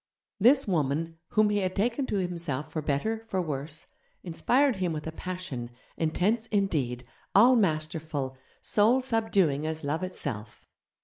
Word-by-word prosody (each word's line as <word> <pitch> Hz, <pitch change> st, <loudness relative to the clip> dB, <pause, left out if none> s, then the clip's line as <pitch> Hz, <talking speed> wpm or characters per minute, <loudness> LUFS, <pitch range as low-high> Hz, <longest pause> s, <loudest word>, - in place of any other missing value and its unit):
This 260 Hz, +6 st, +5 dB
woman, 165 Hz, -1 st, -1 dB
whom 215 Hz, -1 st, +3 dB
he 205 Hz, -, +2 dB
had 185 Hz, -1 st, -1 dB
taken 240 Hz, +6 st, 0 dB
to -, -, -2 dB
himself 170 Hz, -7 st, -2 dB
for 155 Hz, -, -2 dB
better, 150 Hz, +11 st, -1 dB
for 225 Hz, -4 st, -3 dB
worse, 150 Hz, -1 st, -4 dB, 0.4 s
inspired 245 Hz, -, +2 dB
him 180 Hz, -3 st, -1 dB
with 150 Hz, -1 st, -5 dB
a 160 Hz, -, -3 dB
passion, 180 Hz, -9 st, -5 dB, 0.3 s
intense 200 Hz, +8 st, 0 dB
indeed, 145 Hz, -, 0 dB, 0.3 s
all 240 Hz, +6 st, +7 dB
masterful, 155 Hz, -, -1 dB, 0.3 s
soul 225 Hz, +5 st, +3 dB
subduing 200 Hz, -, +1 dB
as 160 Hz, 0 st, -3 dB
Love 145 Hz, +4 st, -1 dB
itself.... 135 Hz, -, -5 dB
175 Hz, 140 wpm, -28 LUFS, 150-210 Hz, 0.4 s, all